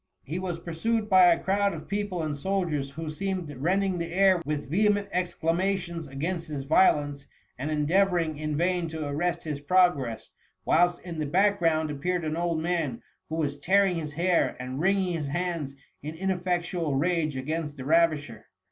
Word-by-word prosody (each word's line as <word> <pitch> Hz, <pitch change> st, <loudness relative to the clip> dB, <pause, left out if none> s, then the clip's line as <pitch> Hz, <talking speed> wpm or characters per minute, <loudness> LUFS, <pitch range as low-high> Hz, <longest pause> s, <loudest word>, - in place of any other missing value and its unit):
He 160 Hz, +7 st, -4 dB
was 180 Hz, -2 st, -3 dB
pursued 210 Hz, +7 st, -2 dB
by 185 Hz, -1 st, +8 dB
a 170 Hz, -1 st, +6 dB
crowd 200 Hz, +1 st, +1 dB
of -, -, -9 dB
people 200 Hz, -4 st, -2 dB
and 150 Hz, -2 st, -2 dB
soldiers, 160 Hz, -4 st, -1 dB
who 155 Hz, +2 st, -6 dB
seemed 180 Hz, -3 st, -3 dB
rending 185 Hz, +5 st, +1 dB
the 170 Hz, 0 st, -4 dB
air 190 Hz, -1 st, +4 dB
with 150 Hz, -1 st, -2 dB
vehement 205 Hz, +5 st, +2 dB
exclama 180 Hz, +2 st, 0 dB
tions 170 Hz, -3 st, -6 dB
against 165 Hz, +6 st, -3 dB
his 145 Hz, -3 st, -4 dB
violence, 145 Hz, -2 st, +2 dB, 0.3 s
and 135 Hz, +5 st, -4 dB
endeavouring 165 Hz, +1 st, +2 dB
in 155 Hz, -1 st, -2 dB
vain 175 Hz, 0 st, +1 dB
to 160 Hz, -2 st, -4 dB
arrest 170 Hz, +4 st, -1 dB
his 150 Hz, -3 st, -4 dB
progress; 145 Hz, -8 st, +2 dB, 0.3 s
whilst 175 Hz, +1 st, +3 dB
in 170 Hz, -3 st, -7 dB
the 150 Hz, -, -1 dB
back 200 Hz, +6 st, +3 dB
ground 160 Hz, -2 st, +1 dB
appeared 170 Hz, +4 st, -2 dB
an 155 Hz, 0 st, -1 dB
old 170 Hz, -1 st, 0 dB
man, 160 Hz, -7 st, -2 dB, 0.3 s
who 160 Hz, -, -3 dB
was 145 Hz, -3 st, -2 dB
tearing 190 Hz, +3 st, +3 dB
his 150 Hz, -2 st, -5 dB
hair 175 Hz, +2 st, +1 dB
and 130 Hz, +2 st, -5 dB
wringing 190 Hz, +1 st, +2 dB
his 155 Hz, -4 st, -3 dB
hands 165 Hz, -3 st, -3 dB, 0.3 s
in 155 Hz, +2 st, -6 dB
ineffectual 175 Hz, -3 st, -1 dB
rage 155 Hz, 0 st, 0 dB
against 150 Hz, +2 st, -3 dB
the 130 Hz, -, -7 dB
ravisher. 150 Hz, -7 st, +1 dB
165 Hz, 175 wpm, -27 LUFS, 150-185 Hz, 0.3 s, by